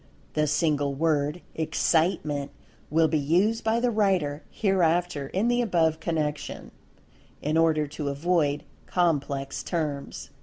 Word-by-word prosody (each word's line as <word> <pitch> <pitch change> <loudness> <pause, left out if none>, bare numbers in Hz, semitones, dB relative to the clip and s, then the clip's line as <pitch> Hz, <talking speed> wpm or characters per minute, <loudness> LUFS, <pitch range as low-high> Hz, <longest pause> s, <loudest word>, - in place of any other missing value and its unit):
The 150 0 +1
single 145 -2 +1
word, 150 +1 0
"Excitement," 155 -3 0 0.4
will 160 +2 +4
be 155 0 +1
used 185 +10 +2
by 220 +1 +2
the 245 0 +1
writer, 185 -9 +1
hereafter, 175 -7 +1
in 195 +10 0
the 240 0 +2
above 165 -8 +2
connection, 155 -3 -3 0.7
in 150 +2 -1
order 160 -2 +3
to 145 0 -4
avoid 145 0 +1 0.2
complex 140 -6 0
terms. 150 -5 -4
160 Hz, 120 wpm, -26 LUFS, 145-180 Hz, 0.7 s, will